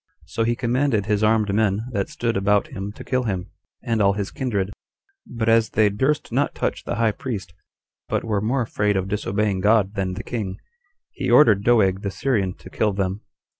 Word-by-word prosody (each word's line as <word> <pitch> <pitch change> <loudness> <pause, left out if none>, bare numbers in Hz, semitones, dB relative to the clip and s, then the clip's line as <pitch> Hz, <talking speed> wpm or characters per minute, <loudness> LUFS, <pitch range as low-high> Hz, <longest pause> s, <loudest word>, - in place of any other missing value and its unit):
So 95 +4 -2
he 120 +1 +1
commanded 120 -3 +1
his 105 0 0
armed 110 -2 +2
men 105 0 +1
that 100 -4 -2
stood 115 -1 -2
about 100 +1 +2
him 100 +1 -5
to - - -10
kill 125 -1 -1
him, 95 -3 -3 0.3
and 115 -3 0
all 100 0 +4
his 100 0 -3
kindred; 105 -7 -2 0.5
but 115 -2 -3
as 115 0 +4
they 105 -1 +3
durst 135 +9 0
not - - 0
touch - - -2
the - - -2
high 115 -1 +2
priest, 100 -8 -6 0.6
but - - 0
were 105 -3 -1
more 125 +4 0
afraid 105 -2 0
of 95 0 -1
disobeying 100 -1 -1
God 105 0 +3
than 95 -3 -2
the - - -6
king, 105 -6 -4 0.5
he - - -3
ordered 105 -9 +6
Doeg 100 -5 +3
the 100 - -2
Syrian 100 -4 -1
to - - -13
kill 105 -2 +1
them. 95 +1 -2
105 Hz, 195 wpm, -23 LUFS, 100-115 Hz, 0.6 s, ordered